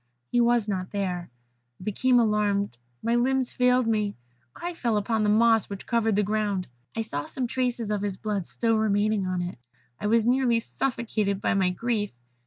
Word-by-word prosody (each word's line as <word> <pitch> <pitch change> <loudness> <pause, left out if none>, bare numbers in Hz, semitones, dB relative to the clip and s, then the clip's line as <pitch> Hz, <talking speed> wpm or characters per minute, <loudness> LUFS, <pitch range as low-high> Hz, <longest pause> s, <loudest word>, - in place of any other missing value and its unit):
He 240 - +3
was 235 -2 +3
not 185 -3 -2
there. 180 -4 -3 0.5
I - - -10
became 245 +5 +3
alarmed; 205 - +1 0.3
my 230 - +1
limbs 255 +1 +1
failed 250 0 +3
me; 210 -2 0 0.4
I 350 +1 -4
fell 235 -9 0
upon 220 +2 0
the 210 - +2
moss 225 0 +4
which 200 -1 -7
covered 225 -3 +1
the 210 - +3
ground. 205 -2 0 0.3
I 225 - -1
saw 145 -9 -4
some 260 - -3
traces 245 -3 -1
of 205 -1 0
his 200 -2 -2
blood 205 -4 -2
still 225 -2 +1
remaining 210 -2 +1
on 180 -1 -1
it. 175 -7 -6 0.4
I - - -2
was 225 +1 +3
nearly 245 -1 +3
suffocated 225 -5 -1
by - - +1
my 190 -2 +2
grief. 210 +2 -1
215 Hz, 185 wpm, -26 LUFS, 200-235 Hz, 0.5 s, moss